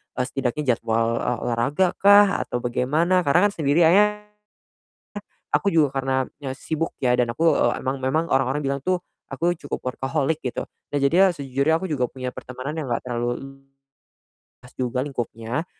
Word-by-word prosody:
eee, 125 Hz, -, 0 dB
setidaknya 135 Hz, +2 st, -2 dB
jadwal, 115 Hz, 0 st, 0 dB
eee, 125 Hz, -, -1 dB
olahragakah 180 Hz, -, +4 dB, 0.2 s
atau 125 Hz, 0 st, -3 dB
bagaimana, 155 Hz, +9 st, +1 dB
karena 170 Hz, +5 st, +5 dB
kan -, -, -8 dB
sendiri 155 Hz, -2 st, +2 dB
akhirnya 210 Hz, +5 st, +4 dB, 1.3 s
aku 200 Hz, -, +1 dB
juga 155 Hz, -4 st, +4 dB
karena 135 Hz, 0 st, 0 dB, 0.3 s
nye 130 Hz, -, -2 dB
sibuk 160 Hz, +4 st, -3 dB
ya 125 Hz, -2 st, +2 dB
dan 120 Hz, -1 st, +1 dB
aku, 165 Hz, +7 st, +2 dB
eee, -, -, +1 dB
emang 130 Hz, +1 st, -2 dB
memang 155 Hz, +5 st, +1 dB
orang-orang 135 Hz, +2 st, +1 dB
bilang 140 Hz, -1 st, -2 dB
tuh 185 Hz, -1 st, +1 dB, 0.3 s
aku 170 Hz, +5 st, 0 dB
cukup 145 Hz, -, -4 dB
workaholic 135 Hz, +4 st, -2 dB
gitu. 125 Hz, -, -4 dB, 0.2 s
Nah 145 Hz, -, +1 dB
jadinya 180 Hz, +7 st, +4 dB
sejujurnya 140 Hz, +2 st, 0 dB
aku 190 Hz, -, -4 dB
juga 140 Hz, -6 st, 0 dB
punya 130 Hz, -1 st, -5 dB
pertemanan 130 Hz, +5 st, -6 dB
yang 155 Hz, -, -3 dB
enggak -, -, 0 dB
terlalu 120 Hz, 0 st, -1 dB
luas 135 Hz, 0 st, -15 dB, 0.9 s
juga 125 Hz, 0 st, -1 dB
lingkupnya, 120 Hz, +1 st, -4 dB
135 Hz, 160 wpm, -23 LUFS, 125-160 Hz, 1.3 s, karena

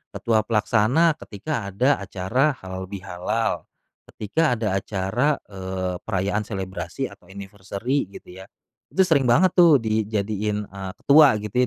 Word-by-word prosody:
ketua 115 Hz, -2 st, +1 dB
pelaksana 120 Hz, +9 st, +2 dB
ketika 110 Hz, +2 st, -5 dB
ada 125 Hz, +9 st, +1 dB
acara 100 Hz, +9 st, 0 dB
halal 95 Hz, 0 st, -6 dB
bihalal, 95 Hz, +3 st, -3 dB, 0.4 s
ketika 125 Hz, +6 st, 0 dB
ada 110 Hz, -4 st, -2 dB
acara, 105 Hz, +10 st, 0 dB, 0.2 s
eee, 95 Hz, -1 st, -4 dB
perayaan 100 Hz, +1 st, -2 dB
selebrasi 95 Hz, +4 st, -5 dB
atau 90 Hz, -, -17 dB
anniversary 100 Hz, +6 st, -4 dB
gitu 90 Hz, +1 st, -12 dB
ya, 95 Hz, -, -10 dB, 0.4 s
itu 190 Hz, -, +2 dB
sering 145 Hz, -7 st, +2 dB
banget 165 Hz, +10 st, +4 dB
tuh 170 Hz, -4 st, +6 dB
dijadiin, 105 Hz, -1 st, -1 dB
eee, 95 Hz, -1 st, -7 dB
ketua 145 Hz, -3 st, +7 dB
gitu 105 Hz, +1 st, -7 dB
105 Hz, 130 wpm, -23 LUFS, 95-130 Hz, 0.4 s, ketua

